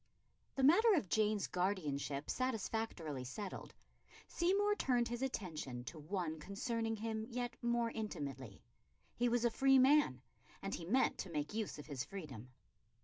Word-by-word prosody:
The 270 Hz, -, 0 dB
matter 395 Hz, -, +7 dB
of 215 Hz, -, 0 dB
Jane's 215 Hz, -2 st, +2 dB
guardianship 150 Hz, -7 st, -1 dB
satisfactorily 220 Hz, -, -2 dB
settled, 190 Hz, +10 st, -6 dB, 0.5 s
Seymour 395 Hz, +4 st, +2 dB
turned 245 Hz, -, +1 dB
his 240 Hz, +1 st, -3 dB
attention 160 Hz, -, -3 dB
to 155 Hz, +5 st, -8 dB
one 160 Hz, 0 st, -3 dB
concerning 225 Hz, +5 st, -2 dB
him 220 Hz, 0 st, -3 dB
yet 245 Hz, -1 st, -3 dB
more 235 Hz, -1 st, +1 dB
intimately. 140 Hz, -, -5 dB, 0.5 s
He 245 Hz, 0 st, +2 dB
was 240 Hz, 0 st, +2 dB
a 235 Hz, -, +3 dB
free 270 Hz, +3 st, +5 dB
man, 260 Hz, -, +5 dB, 0.4 s
and 195 Hz, +1 st, -4 dB
he 165 Hz, -, -4 dB
meant 250 Hz, +9 st, +2 dB
to 195 Hz, -, -4 dB
make 150 Hz, +2 st, -3 dB
use 220 Hz, -6 st, -2 dB
of 150 Hz, -, -8 dB
his 140 Hz, -3 st, -3 dB
freedom. 140 Hz, -, -8 dB
215 Hz, 145 wpm, -37 LUFS, 155-240 Hz, 0.5 s, matter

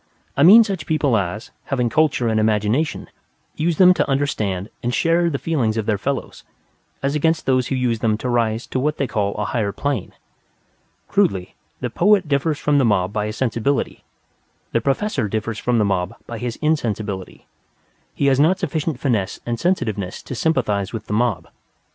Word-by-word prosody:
I -, -, 0 dB
mean 205 Hz, +9 st, +9 dB
such 195 Hz, -8 st, -4 dB
people 150 Hz, -6 st, +2 dB
as, 100 Hz, +1 st, -2 dB
having 125 Hz, -3 st, 0 dB
culture 140 Hz, -1 st, +2 dB
and 110 Hz, -1 st, +1 dB
imagination, 110 Hz, +7 st, 0 dB, 0.5 s
use 165 Hz, 0 st, 0 dB
them 185 Hz, -1 st, +7 dB
to -, -, -1 dB
understand 110 Hz, -9 st, -1 dB
and 120 Hz, -, -1 dB
share 170 Hz, +6 st, +2 dB
the 140 Hz, -, -2 dB
feelings 130 Hz, -9 st, -1 dB
of 110 Hz, -, -1 dB
their 105 Hz, -3 st, 0 dB
fellows; 140 Hz, +4 st, -4 dB, 0.6 s
as 140 Hz, +1 st, 0 dB
against 160 Hz, +2 st, +1 dB
those 130 Hz, -2 st, +2 dB
who 135 Hz, -, -1 dB
use 125 Hz, -3 st, 0 dB
them 110 Hz, -1 st, +1 dB
to 125 Hz, -, -5 dB
rise 115 Hz, -1 st, 0 dB
to 130 Hz, -, +1 dB
what 150 Hz, +3 st, 0 dB
they 140 Hz, -, 0 dB
call 100 Hz, -4 st, -1 dB
a 105 Hz, -, -2 dB
higher 100 Hz, 0 st, -1 dB
plane. 140 Hz, -3 st, -3 dB, 0.9 s
Crudely, 95 Hz, -2 st, 0 dB, 0.3 s
the -, -, -3 dB
poet 195 Hz, -1 st, +3 dB
differs 145 Hz, +1 st, 0 dB
from 145 Hz, -1 st, +2 dB
the -, -, +3 dB
mob 100 Hz, -4 st, +1 dB
by 105 Hz, 0 st, -1 dB
his 110 Hz, -, -6 dB
sensibility; 130 Hz, +2 st, -1 dB, 0.7 s
the 115 Hz, -, +1 dB
professor 140 Hz, -, 0 dB
differs 110 Hz, +1 st, -3 dB
from 125 Hz, -1 st, +1 dB
the 105 Hz, -, +3 dB
mob 95 Hz, +1 st, -1 dB
by 115 Hz, -1 st, -7 dB
his 120 Hz, -1 st, -3 dB
insensibility. 110 Hz, -11 st, -2 dB, 0.7 s
He 140 Hz, -, 0 dB
has 135 Hz, -1 st, +3 dB
not 165 Hz, +6 st, +4 dB
sufficient 155 Hz, -4 st, -2 dB
finesse 110 Hz, -9 st, -1 dB
and 120 Hz, -1 st, -2 dB
sensitiveness 105 Hz, -, -1 dB
to -, -, -7 dB
sympathize 115 Hz, -, 0 dB
with 110 Hz, -2 st, -5 dB
the 105 Hz, -, -4 dB
mob. 115 Hz, -3 st, 0 dB
120 Hz, 180 wpm, -21 LUFS, 105-150 Hz, 0.9 s, mean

